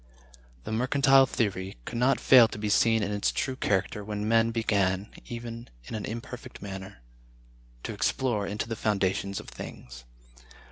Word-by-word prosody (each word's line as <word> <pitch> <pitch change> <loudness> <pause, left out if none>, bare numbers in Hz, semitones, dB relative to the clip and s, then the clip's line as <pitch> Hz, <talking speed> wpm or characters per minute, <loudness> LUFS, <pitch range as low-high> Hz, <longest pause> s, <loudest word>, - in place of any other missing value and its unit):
The - - -6
Mercantile 135 +3 +4
Theory 95 - -2
could 115 - -4
not 130 +3 +3
fail 125 -3 +7
to 110 - -8
be 105 0 -2
seen 110 +1 +3
in 100 - -2
its 105 0 0
true 130 - -2
character 105 -2 -1
when 105 0 -3
men 115 0 +4
began, 100 -3 0 0.2
even 115 0 -7 0.2
in - - -9
an 110 -2 -3
imperfect 115 +2 -7
manner, 95 -9 -8 0.8
to - - -4
explore 115 -6 0
into 105 +3 -3
the 115 - -3
foundations 100 -2 0
of - - -11
things. 60 0 -10
110 Hz, 155 wpm, -28 LUFS, 100-115 Hz, 0.8 s, fail